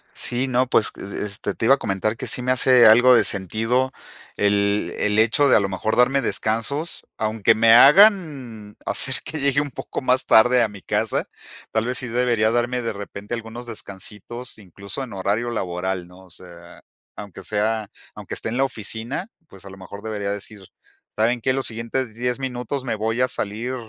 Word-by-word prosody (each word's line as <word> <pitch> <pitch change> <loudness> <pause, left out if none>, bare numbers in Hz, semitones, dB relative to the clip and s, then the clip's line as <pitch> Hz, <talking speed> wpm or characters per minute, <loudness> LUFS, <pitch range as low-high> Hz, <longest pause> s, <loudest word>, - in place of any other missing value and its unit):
Sí, 125 +2 -1
no, 130 0 +1
pues, 115 -3 +3
e - - -9
es 100 - -8
este, 100 0 -4
te - - -3
iba 135 - +6
a - - -13
comentar 110 +1 -2
que - - -5
sí - - -1
me 125 +1 0
hace 130 -1 +5
algo 120 +4 +7
de 115 - +5
sentido 115 +7 0 0.5
el 100 0 +1
el 105 +1 +1
hecho 115 +6 +4
de - - +6
a - - +6
lo 100 -1 -1
mejor 110 +3 -2
darme 135 +3 +3
descansos, 115 +8 -2
aunque 110 0 +2
me 115 +1 +5
hagan 140 - +4
hacer 130 - +1
que 160 - -5
llegue 140 0 +2
un 145 - -4
poco - - -6
más 130 0 +1
tarde 125 +3 +5
a - - +1
mi 100 -2 -12
casa. - - -1 0.5
Tal 110 0 0
vez 125 0 -1
sí 125 - -4
debería 120 -2 +1
darme 120 +1 0
de 115 - -3
repente 100 +1 -8
algunos 115 +1 -6
descansitos, 110 +2 -8
incluso, 100 +4 -7
en 125 - -9
horario 100 +5 -1
laboral, 90 -3 -3
¿no? 90 +1 -16
O - - -21
sea, 85 0 -15 0.3
aunque 100 -2 -10
sea 110 +2 -1 0.3
aunque - - -8
esté - - -3
en 120 - -3
la 135 - +3
oficina, 115 - -4 0.2
pues, 95 - -15
a - - -9
lo 95 - -12
mejor 100 +2 -10
debería 105 -2 -4
decir: 100 0 -8 0.5
"¿Saben 115 +3 +1
qué?, 130 +3 +1
los 135 0 -1
siguientes 115 +1 -3
10 125 +2 -2
minutos 130 +1 -4
me 125 - -2
voy 110 +3 -2
a 125 - +3
salir, 115 +2 -4
115 Hz, 195 wpm, -22 LUFS, 105-125 Hz, 0.5 s, algo